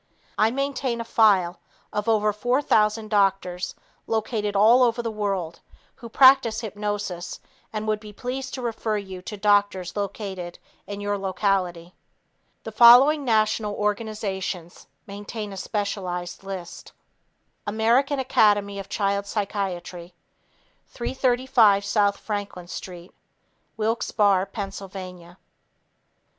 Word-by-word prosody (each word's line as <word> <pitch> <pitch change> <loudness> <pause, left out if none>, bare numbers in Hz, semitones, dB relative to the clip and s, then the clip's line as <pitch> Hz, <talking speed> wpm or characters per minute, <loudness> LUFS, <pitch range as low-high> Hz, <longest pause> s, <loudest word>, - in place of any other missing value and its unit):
I 215 - +3
maintain 265 -1 -2
a - - -2
file 200 -6 +3 0.3
of 210 +2 -1
over 210 -1 +2
4,000 220 -2 +1
doctors 195 -3 0 0.3
located 215 -2 -1
all 225 +5 +6
over 240 -1 +2
the 230 - -2
world 195 -6 -3 0.4
who 235 - -10
practice 260 -3 +5
hypnosis 205 -5 -4 0.3
and 215 0 -4
would 215 -1 0
be 210 -1 -11
pleased 260 +5 -5
to 255 - -6
refer 225 -2 -2
you 190 -2 -7
to 210 +3 -7
doctors 205 -3 +1
located 195 -3 -5 0.3
in 205 0 -6
your 205 0 -2
locality. 185 -3 -1 0.7
The 220 - -6
following 250 +7 +7
national 215 -3 +1
organizations 205 -4 -3 0.2
maintain 205 +1 -7
a - - -8
specialized 185 -4 -4
list: 185 -3 -8 0.7
American 235 +7 +2
Academy 205 -6 +2
of 195 0 -8
Child 200 -1 -1
Psychiatry 185 -4 -4 0.7
335 245 -5 +2
S. 200 0 +1
Franklin 205 -4 -5
St. 175 0 -9 0.6
Wilkes 225 +2 -1
Barre, 200 -3 +2
Pa. 190 -4 -8
205 Hz, 110 wpm, -24 LUFS, 195-225 Hz, 0.7 s, following